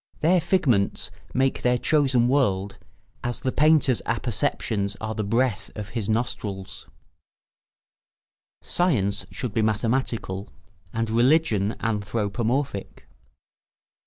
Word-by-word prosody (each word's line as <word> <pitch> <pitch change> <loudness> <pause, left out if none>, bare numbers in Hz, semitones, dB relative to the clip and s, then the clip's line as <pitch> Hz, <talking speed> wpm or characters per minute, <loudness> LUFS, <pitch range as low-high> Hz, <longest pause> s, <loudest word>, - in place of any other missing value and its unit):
Their 170 +3 +4
figments 125 - +1 0.2
make 135 +1 +1
their 125 0 +3
chosen 135 -4 +3
world, 100 -8 +1 0.4
as 120 0 -2
the 130 - -1
painter's 150 -4 +4
apperceptions 110 -3 -1
are 110 0 -3
the 110 - -2
breath 115 0 0
of 105 -1 -6
his 110 -2 -3
nostrils. 105 -4 -3 1.8
[Sidenote: 125 - +1
Science 100 - -7
should 125 -5 -5
be 110 - +1
mathematical 110 -2 -1 0.4
and 115 0 -1
religion 115 -4 +3
anthropomorphic. 110 +2 -2
115 Hz, 100 wpm, -25 LUFS, 105-130 Hz, 1.8 s, Their